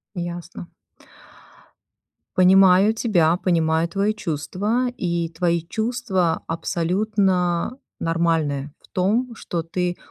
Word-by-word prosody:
Ясно. 175 0 -6 1.7
Понимаю 190 +2 +6
тебя, 175 -8 +2
понимаю 165 -2 +1
твои 200 +4 0
чувства, 205 - -2
и 170 -4 -1
твои 170 0 0
чувства 220 -5 -1
абсолютно 180 +4 0 0.2
нормальные 165 -4 0
в - - -23
том, 225 +6 0
что 170 -5 -4
ты 175 +1 -2
180 Hz, 90 wpm, -22 LUFS, 165-205 Hz, 1.7 s, Понимаю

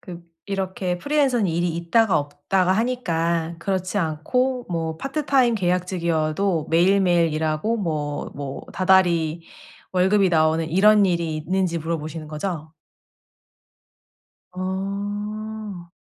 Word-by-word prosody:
그 175 -1 -9 0.2
이렇게 190 -2 -2
프리랜서는 265 -2 +1
일이 175 +1 0
있다가 190 +5 +2
없다가 165 +6 0
하니까 170 -8 0
그렇지 190 +2 -2
않고 245 +11 -1
뭐 165 -1 -2
파트타임 270 - +1
계약직이어도 175 -2 0
매일매일 175 -1 +3
일하고 155 +8 0
뭐 155 -7 -3
뭐 140 -1 -6
다달이 175 -4 +2 0.5
월급이 190 +1 +3
나오는 160 0 +2
이런 205 +4 +5
일이 170 -4 0
있는지 180 +2 -1
물어보시는 160 -1 -4
거죠? 155 0 -5 1.8
아. 200 +1 -5
180 Hz, 260 characters per minute, -23 LUFS, 160-200 Hz, 1.8 s, 이런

